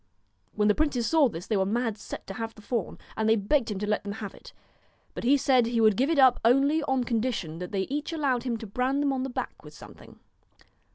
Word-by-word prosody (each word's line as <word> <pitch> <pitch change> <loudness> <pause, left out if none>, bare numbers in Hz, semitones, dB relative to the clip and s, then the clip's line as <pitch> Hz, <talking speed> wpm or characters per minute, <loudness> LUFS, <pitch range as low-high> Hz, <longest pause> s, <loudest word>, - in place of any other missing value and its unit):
When 210 0 +2
the 210 - +5
princes 270 -3 0
saw 310 -3 +4
this, 175 -3 -7
they 220 - -1
were 190 - +2
mad 225 +2 -1
set - - -9
to 195 - -7
have 225 +2 -5
the 215 - -15
fawn, 220 -3 -3 0.2
and 220 0 0
they 225 - +5
begged 225 +5 +1
him 210 - -3
to 205 - -3
let 210 - 0
them 200 -1 -5
have 210 -2 -7
it; - - -14 0.6
but - - -6
he 270 +4 +4
said 255 -3 +3
he 235 0 0
would 215 -2 +5
give 265 +7 +1
it 330 - +1
up 260 -3 +6
only 275 +7 +3
on 265 -3 0
condition 225 -9 -2
that 180 0 -6
they 195 -2 -1
each 290 - -3
allowed 280 -7 0
him 240 -2 -2
to 225 - -8
brand 255 +7 -1
them 280 -1 +1
on 260 - -2
the 265 - -3
back 245 - -6
with - - -13
something. - - -14
235 Hz, 250 wpm, -27 LUFS, 210-270 Hz, 0.6 s, up